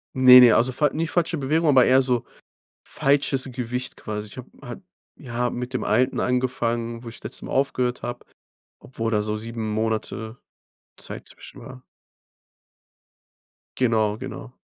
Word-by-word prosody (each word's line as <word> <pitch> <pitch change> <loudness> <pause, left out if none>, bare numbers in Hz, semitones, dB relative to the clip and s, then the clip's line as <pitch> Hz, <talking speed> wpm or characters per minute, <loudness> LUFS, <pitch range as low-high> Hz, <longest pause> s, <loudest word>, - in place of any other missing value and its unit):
Ne, 130 -1 +9
ne, 120 -3 +7
also 125 +3 +3
fal 150 +3 +1
nie 165 +1 -1
falsche 170 -1 0
Bewegung, 155 +3 +1
aber 130 -3 +6
eher 130 +1 +5
so 125 -2 -1 0.6
falsches 140 -1 +1
Gewicht 125 0 -4
quasi. 105 0 -6
Ich 105 - -13
habe 125 - -9
halt 125 +7 -9 0.4
ja 120 -2 -3
mit 125 +1 -6
dem 130 - -2
Alten 125 +5 +1
angefangen, 120 -2 -1
wo 115 - -7
ich 115 - -12
letztes 110 - -7
Mal - - -8
aufgehört 125 -3 -1
habe, 120 +1 -6 0.5
obwohl 115 -3 -5
da 105 -1 +1
so 105 0 -3
7 115 -1 -5
Monate 110 +1 -3 0.6
Zeit - - -7
zwischen - - -14
war. 130 -1 -11 1.9
Genau, 110 -4 +1
genau. 130 0 -8
125 Hz, 150 wpm, -23 LUFS, 115-130 Hz, 1.9 s, Ne